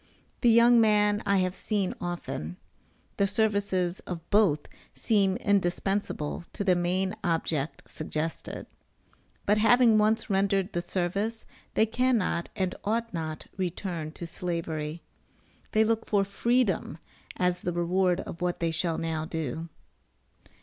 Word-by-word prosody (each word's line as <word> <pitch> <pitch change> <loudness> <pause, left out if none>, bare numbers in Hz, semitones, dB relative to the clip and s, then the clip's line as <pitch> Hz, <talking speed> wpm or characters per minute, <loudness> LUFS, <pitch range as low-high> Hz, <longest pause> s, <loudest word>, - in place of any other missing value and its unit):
The 240 - +5
young 235 +1 +7
man 210 -1 +3
I 200 0 +4
have 185 - -2
seen 200 -2 -1
often 170 - -4 0.6
the 200 - +3
services 200 -4 +1
of 170 -2 -6
both 195 -8 +4 0.3
seem 200 -4 +2
indispensable 195 -4 0
to - - -3
the 190 -2 +4
main 185 +2 0
object 160 -4 -1
suggested; 155 +1 -4 0.8
but 210 +1 +3
having 230 0 +5
once 220 +1 +2
rendered 195 0 +1
the 175 - 0
service, 195 +6 -2 0.3
they 220 - +5
cannot, 225 -7 +1
and 185 -1 -1
ought 230 +1 -1
not 160 -2 -4
return 175 -3 -3
to 170 - -7
Slavery. 165 -2 -4 0.7
They 220 0 +4
look 225 0 0
for 200 -2 +3
freedom 210 - 0 0.4
as 180 0 +1
the 175 - -2
reward 180 +1 +1
of 170 - -8
what 180 0 -1
they 165 -1 0
shall 165 0 0
now 160 -1 -2
do. 160 +1 -4
185 Hz, 130 wpm, -28 LUFS, 170-210 Hz, 0.8 s, young